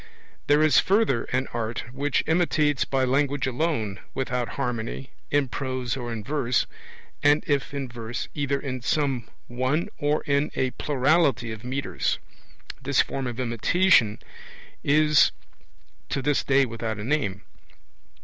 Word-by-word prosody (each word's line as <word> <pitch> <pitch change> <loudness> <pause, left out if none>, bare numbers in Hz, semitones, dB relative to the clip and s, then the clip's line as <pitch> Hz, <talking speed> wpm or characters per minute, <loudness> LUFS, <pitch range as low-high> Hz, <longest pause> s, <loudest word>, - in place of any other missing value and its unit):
There 145 +1 +5
is 155 -5 +6
further 195 - +2
an 130 +1 -1
art 115 -1 -3
which 140 +3 0
imitates 155 -4 +2
by 135 -1 0
language 140 +1 +1
alone, 125 -7 -1 0.2
without 125 -2 -1
harmony, 125 0 -3 0.2
in 145 -1 +2
prose 130 -1 -3
or 120 -3 -5
in 110 -2 -4
verse, 130 -3 +1 0.6
and 145 +1 +4
if 140 -2 0
in 140 -2 -3
verse, 120 0 -5
either 140 -1 -1
in 130 -3 -4
some 135 -4 0 0.2
one 130 +6 -1
or 145 +1 +1
in 140 +1 +1
a 130 -1 0
plurality 140 -4 +2
of 110 0 -8
metres. 130 +3 -1 0.6
This - - +1
form 135 -2 -3
of 120 0 -5
imitation 125 - +3 0.7
is 150 +1 +5 0.8
to 135 - -2
this 145 0 +2
day 140 0 +4
without 115 -2 -4
a 105 - -5
name. 110 -7 -1
135 Hz, 140 wpm, -25 LUFS, 120-145 Hz, 0.8 s, is